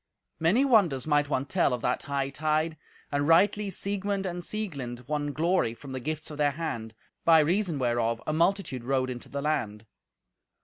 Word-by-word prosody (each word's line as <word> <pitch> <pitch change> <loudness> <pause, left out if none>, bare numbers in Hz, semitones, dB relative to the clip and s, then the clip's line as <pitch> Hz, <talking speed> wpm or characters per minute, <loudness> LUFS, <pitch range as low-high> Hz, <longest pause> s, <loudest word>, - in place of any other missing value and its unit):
Many 195 +12 +3
wonders 190 - +3
might 145 -1 +2
one 135 -2 0
tell 170 -3 +1
of 120 - -9
that 125 - 0
hightide, 150 +3 0 0.4
and 145 0 0
rightly 200 +5 +4
Siegmund 200 +1 -2
and 175 -1 -3
Sieglind 140 - -5
won 145 -1 -1
glory 160 -6 +1
from 140 +2 -10
the 130 - -3
gifts 155 +4 -4
of 150 - -8
their 145 -1 +4
hand, 115 -8 -4 0.3
by 165 -1 +7
reason 170 +2 +2
whereof 120 -2 0
a 155 - -1
multitude 165 -6 +1
rode 130 0 0
into 120 -1 -8
the 140 0 -4
land. 110 -8 -2
150 Hz, 170 wpm, -28 LUFS, 130-175 Hz, 0.4 s, by